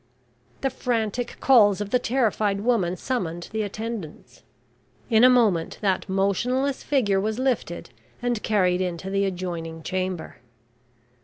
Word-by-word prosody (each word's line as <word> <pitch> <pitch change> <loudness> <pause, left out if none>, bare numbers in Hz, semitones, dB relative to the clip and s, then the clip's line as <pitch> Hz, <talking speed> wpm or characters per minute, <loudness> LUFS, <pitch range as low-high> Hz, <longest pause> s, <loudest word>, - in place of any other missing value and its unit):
The 270 - 0
frantic 240 -2 -2
calls 210 -7 +5
of 205 -1 -4
the 250 - +3
terrified 215 -5 0
woman 200 -6 +1
summoned 175 -10 -3
the 220 0 -1
attendants. 215 -5 -6 0.7
In 220 +1 +5
a 255 - +9
moment, 220 -10 +2
that 195 -1 0
motionless 245 +8 0
figure 210 -9 +1
was 215 +2 -2
lifted 250 -9 -2 0.3
and 245 -3 -1
carried 185 -4 +2
into 180 +1 -3
the 200 0 +1
adjoining 170 -3 -4
chamber. 185 -2 -3
205 Hz, 130 wpm, -24 LUFS, 185-240 Hz, 0.7 s, a